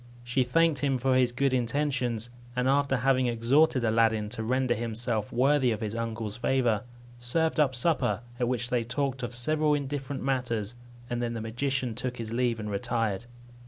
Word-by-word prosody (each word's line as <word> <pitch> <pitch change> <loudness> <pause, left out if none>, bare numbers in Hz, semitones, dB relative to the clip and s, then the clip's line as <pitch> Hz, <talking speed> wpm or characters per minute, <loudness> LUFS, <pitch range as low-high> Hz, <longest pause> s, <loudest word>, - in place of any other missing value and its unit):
She 120 +2 +1
thanked 155 +3 +2
him 135 -1 +1
for 130 +1 +1
his 125 -1 +3
good 135 +2 +1
intentions; 125 -2 0 0.2
and 125 0 +1
after 140 0 +2
having 130 0 +2
exhorted 125 +4 +3
Aladdin 110 -1 +2
to 110 0 -4
render 130 +1 +1
himself 115 -1 -1
worthy 135 +1 +3
of 110 -3 -1
his 105 -1 -3
uncle's 115 -2 -3
favour, 120 -4 +1 0.3
served 160 +7 0
up 135 -4 +3
supper, 125 - +1 0.2
at 120 - +1
which 125 0 -1
they 120 -2 +1
talked 135 +2 -2
of 120 0 -4
several 150 +4 +3
indifferent 140 -1 -4
matters; 120 -5 -1 0.3
and 120 0 -2
then 120 -1 -1
the 115 - -4
magician 125 +2 -2
took 125 +2 -4
his 115 -1 -5
leave 120 -1 0
and 105 -1 -4
retired. 110 0 -1
125 Hz, 175 wpm, -28 LUFS, 115-135 Hz, 0.3 s, his